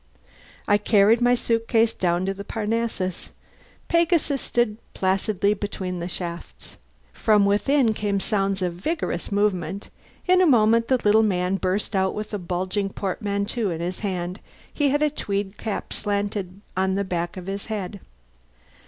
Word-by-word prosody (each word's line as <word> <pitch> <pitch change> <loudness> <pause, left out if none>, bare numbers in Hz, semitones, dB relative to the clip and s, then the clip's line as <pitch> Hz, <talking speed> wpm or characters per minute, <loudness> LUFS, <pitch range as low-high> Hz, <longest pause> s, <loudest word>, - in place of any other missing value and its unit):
I 205 0 +4
carried 210 +2 +4
my 245 0 +5
suit 230 -1 0
case 230 -1 +3
out 175 +1 +2
to 195 - 0
the 200 +1 -7
Parnassus. 220 -4 -2 0.6
Pegasus 335 -5 +2
stood 240 -3 0 0.2
placidly 195 +1 +1
between 190 -3 -4
the 170 - -3
shafts. 175 -1 -7 0.4
From 210 -2 +3
within 225 +4 +3
came 205 -2 -1
sounds 195 -1 0
of 175 -1 -1
vigorous 195 - -3
movement. 200 -2 -1 0.4
In 365 0 +5
a 365 - +5
moment 230 -3 +4
the 260 - +3
little 215 -1 +4
man 185 -3 +1
burst 195 +3 -1
out 190 0 +1
with 215 +1 -5
a 205 - -1
bulging 185 +3 -2
portmanteau 200 +3 -2
in 165 -2 -3
his 175 +2 -3
hand. 185 -2 -3 0.3
He 290 -2 +2
had 290 +2 +2
a 300 - +2
tweed 200 -6 -3
cap 215 -3 -4
slanted 200 -2 -2
on 190 +1 +1
the 200 - 0
back 175 -1 -3
of 180 - -7
his 195 +1 -4
head. 205 -2 -4
200 Hz, 155 wpm, -24 LUFS, 185-225 Hz, 0.6 s, my